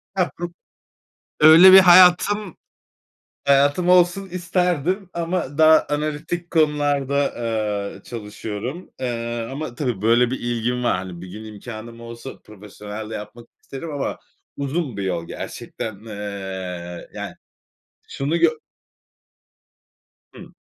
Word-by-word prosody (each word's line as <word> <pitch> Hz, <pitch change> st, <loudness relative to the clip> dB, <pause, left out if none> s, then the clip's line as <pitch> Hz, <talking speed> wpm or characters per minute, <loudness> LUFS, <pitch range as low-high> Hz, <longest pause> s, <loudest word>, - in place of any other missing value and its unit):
Hah, 185 Hz, -2 st, +1 dB
hı. 175 Hz, -, -2 dB, 0.9 s
Öyle 165 Hz, +5 st, +9 dB
bir 190 Hz, -, +12 dB
hayatım, 185 Hz, +2 st, +5 dB, 0.9 s
hayatım 145 Hz, +6 st, +3 dB
olsun 180 Hz, +2 st, +3 dB
isterdim 180 Hz, 0 st, -1 dB
ama 170 Hz, -4 st, -3 dB
daha 155 Hz, 0 st, +6 dB
analitik 155 Hz, +4 st, -3 dB
konularda, 145 Hz, -3 st, +1 dB
aaa, 110 Hz, -7 st, -2 dB
çalışıyorum. 115 Hz, -, -6 dB
Eee, 120 Hz, -2 st, -3 dB
ama 140 Hz, -3 st, -6 dB
tabii, 125 Hz, -7 st, -2 dB
böyle, 120 Hz, +2 st, +3 dB
bir 130 Hz, -, -3 dB
ilgim 120 Hz, +1 st, -2 dB
var. 120 Hz, -, +2 dB
Hani, 90 Hz, -2 st, -7 dB
bir 95 Hz, -, -9 dB
gün 105 Hz, +4 st, -9 dB
imkânım 115 Hz, +2 st, -9 dB
olsa 115 Hz, +3 st, -9 dB
profesyonel 105 Hz, +1 st, -9 dB
de -, -, -7 dB
yapmak 115 Hz, +3 st, -9 dB
isterim 155 Hz, +4 st, -8 dB
ama 145 Hz, -2 st, -3 dB, 0.4 s
uzun 140 Hz, -3 st, -3 dB
bir 100 Hz, -, -3 dB
yol 85 Hz, -3 st, -3 dB
gerçekten, 110 Hz, -3 st, -7 dB
eee, 95 Hz, -4 st, -6 dB
yani. -, -, -6 dB, 0.7 s
Şunu 145 Hz, +4 st, -2 dB
gö 170 Hz, -1 st, +5 dB, 1.9 s
Hı. -, -, -12 dB
130 Hz, 115 wpm, -22 LUFS, 110-165 Hz, 1.9 s, bir